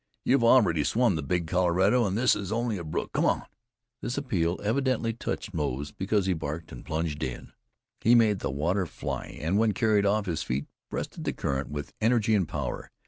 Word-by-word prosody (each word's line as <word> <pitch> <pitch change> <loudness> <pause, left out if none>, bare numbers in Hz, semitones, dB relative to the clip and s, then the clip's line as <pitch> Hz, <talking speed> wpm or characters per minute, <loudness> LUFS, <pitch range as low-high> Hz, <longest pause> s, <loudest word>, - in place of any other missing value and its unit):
"You've 130 -2 +3
already 110 - +5
swum 115 - +2
the 80 - -2
Big 85 +4 -1
Colorado, 95 +7 +3
and 95 +2 -1
this 120 0 +4
is 100 -1 -4
only 115 -3 -1
a - - -5
brook. 75 - -3
Come - - +1
on!" - - +2 0.6
This 120 - -3
appeal 95 - 0
evidently 115 0 +1
touched 110 -2 -4
Moze, 70 -3 -2
for 100 +2 +1
he 95 0 +1
barked, 80 0 -5
and 60 - -9
plunged 80 -1 -2
in. 65 -4 -5 0.5
He 120 +2 +5
made 110 -4 +4
the - - -2
water 85 +8 0
fly, - - -5
and 85 +7 +1
when 110 -1 +3
carried 105 0 +2
off 105 +1 +2
his 85 -5 -2
feet, 65 +4 -2 0.2
breasted - - -5
the - - -1
current 65 0 -2
with 75 0 -6
energy 110 -1 +3
and 95 -6 +2
power. - - -4
95 Hz, 195 wpm, -28 LUFS, 80-110 Hz, 0.6 s, already